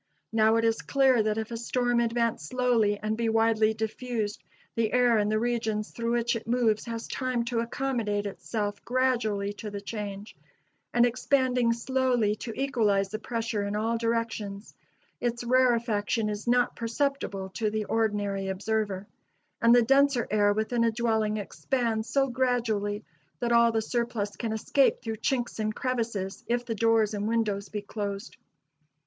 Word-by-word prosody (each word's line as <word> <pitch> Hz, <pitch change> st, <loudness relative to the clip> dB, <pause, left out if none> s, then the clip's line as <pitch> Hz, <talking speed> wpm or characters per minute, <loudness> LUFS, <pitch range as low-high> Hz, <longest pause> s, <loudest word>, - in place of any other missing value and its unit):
Now, 220 Hz, 0 st, +4 dB
it 230 Hz, 0 st, +2 dB
is 225 Hz, 0 st, +1 dB
clear 265 Hz, -4 st, +3 dB
that 215 Hz, 0 st, 0 dB
if 220 Hz, +1 st, -3 dB
a 230 Hz, -, -3 dB
storm 245 Hz, +1 st, 0 dB
advance 230 Hz, -5 st, 0 dB
slowly, 235 Hz, -1 st, +2 dB
and 215 Hz, +1 st, -2 dB
be 230 Hz, 0 st, 0 dB
widely 220 Hz, -1 st, +3 dB
diffused, 220 Hz, -1 st, -3 dB, 0.3 s
the 225 Hz, -2 st, 0 dB
air 245 Hz, -3 st, +4 dB
in 210 Hz, 0 st, +1 dB
the 215 Hz, -, +2 dB
regions 225 Hz, -2 st, -1 dB
through 235 Hz, 0 st, -2 dB
which 240 Hz, 0 st, +1 dB
it 230 Hz, -, -6 dB
moves 230 Hz, -3 st, +1 dB
has 230 Hz, -1 st, -5 dB
time 255 Hz, -3 st, -1 dB
to 235 Hz, -1 st, -1 dB
accommodate 230 Hz, -4 st, -1 dB
itself 205 Hz, 0 st, -4 dB
gradually 235 Hz, -6 st, 0 dB
to 210 Hz, +1 st, -7 dB
the 205 Hz, 0 st, -5 dB
change, 205 Hz, 0 st, -6 dB, 0.6 s
and 240 Hz, 0 st, +4 dB
expanding 250 Hz, -1 st, +2 dB
slowly 240 Hz, -3 st, +1 dB
to 230 Hz, -, -6 dB
equalize 210 Hz, -8 st, +1 dB
the 215 Hz, +2 st, -4 dB
pressure 230 Hz, -2 st, -2 dB
in 200 Hz, +1 st, -2 dB
all 225 Hz, +2 st, 0 dB
directions, 230 Hz, -3 st, -2 dB, 0.5 s
its 240 Hz, 0 st, -2 dB
rarefaction 235 Hz, -3 st, +2 dB
is 210 Hz, +2 st, -5 dB
not 245 Hz, 0 st, +2 dB
perceptible 230 Hz, -5 st, -2 dB
to 215 Hz, +3 st, -1 dB
the 215 Hz, 0 st, -2 dB
ordinary 205 Hz, -3 st, 0 dB
observer: 200 Hz, 0 st, -2 dB, 0.6 s
and 235 Hz, 0 st, +6 dB
the 240 Hz, -, +6 dB
denser 270 Hz, 0 st, +3 dB
air 205 Hz, -1 st, +4 dB
within 220 Hz, +3 st, 0 dB
a 230 Hz, -, +4 dB
dwelling 220 Hz, -2 st, 0 dB
expands 225 Hz, +1 st, -2 dB
so 275 Hz, +1 st, +2 dB
gradually 230 Hz, -5 st, 0 dB, 0.3 s
that 240 Hz, -1 st, -1 dB
all 235 Hz, 0 st, +5 dB
the 225 Hz, -1 st, 0 dB
surplus 225 Hz, -3 st, -2 dB
can 230 Hz, -2 st, -3 dB
escape 250 Hz, +5 st, +2 dB
through 225 Hz, -2 st, -3 dB
chinks 240 Hz, 0 st, -1 dB
and 215 Hz, 0 st, -1 dB
crevices, 230 Hz, -7 st, -2 dB
if 240 Hz, +1 st, 0 dB
the 230 Hz, -, -2 dB
doors 225 Hz, -1 st, +2 dB
and 205 Hz, 0 st, -2 dB
windows 210 Hz, -4 st, 0 dB
be 210 Hz, +1 st, -4 dB
closed. 205 Hz, +1 st, -5 dB
225 Hz, 160 wpm, -28 LUFS, 210-240 Hz, 0.6 s, and